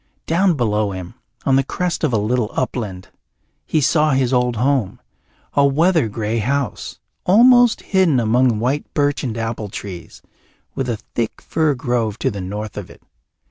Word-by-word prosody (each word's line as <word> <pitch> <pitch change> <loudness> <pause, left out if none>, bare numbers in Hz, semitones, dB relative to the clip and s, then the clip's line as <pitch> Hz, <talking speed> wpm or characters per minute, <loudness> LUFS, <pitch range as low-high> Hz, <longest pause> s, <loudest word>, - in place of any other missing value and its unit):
Down 175 +2 +2
below 105 -5 0
him, 90 +1 -7 0.3
on 135 -1 +4
the 135 - +3
crest 180 +6 -3
of 150 - +2
a 115 - +2
little 110 +1 0
upland, 105 -8 -3 0.6
he 155 - +1
saw 150 +1 +2
his 130 -1 +1
old 125 -1 +1
home, 125 -3 0 0.5
a 140 - +3
weather 155 +1 +3
grey 110 +1 -2
house, 135 +4 -2 0.3
almost 245 +4 +5
hidden 185 -9 +2
among 120 +1 +2
white 130 +6 -2
birch 145 -1 +1
and 115 -4 -3
apple 115 -2 -3
trees, 95 -3 -9 0.5
with 130 -2 -3
a 115 - -1 0.2
thick 115 -2 -2
fir 155 -3 0
grove 120 -4 -1
to - - -1
the 100 -2 -6
north 105 +3 -6
of - - -6
it. - - -16
125 Hz, 165 wpm, -19 LUFS, 110-145 Hz, 0.6 s, almost